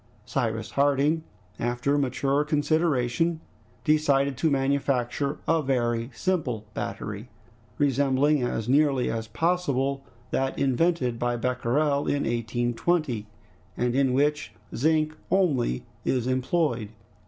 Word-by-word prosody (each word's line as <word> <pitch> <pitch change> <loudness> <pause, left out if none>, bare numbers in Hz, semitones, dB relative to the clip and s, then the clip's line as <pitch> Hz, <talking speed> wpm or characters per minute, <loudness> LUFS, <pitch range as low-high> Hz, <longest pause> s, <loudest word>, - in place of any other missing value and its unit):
Cyrus 115 -4 -2
Harding, 145 +3 +2 0.4
after 120 +4 0
mature 140 +1 +1
consideration, 155 0 +1 0.4
decided 140 -3 +2
to 160 - +2
manufacture 140 -1 0
a 165 -1 +3
very 120 -4 0
simple 125 - -1
battery, 105 +2 -5 0.5
resembling 140 +1 +2
as 120 -2 -2
nearly 135 -1 +3
as 115 0 -3
possible 140 -1 0 0.3
that 135 0 -1
invented 135 -2 +1
by 120 0 0
Becquerel 125 +4 0
in 145 - +1
1820, 120 +2 -1 0.5
and 120 0 0
in 135 -1 +2
which 150 +3 +1 0.2
zinc 155 +3 +1
only 140 - +1 0.2
is 125 -3 0
employed. 130 -3 0
135 Hz, 105 wpm, -26 LUFS, 120-150 Hz, 0.5 s, a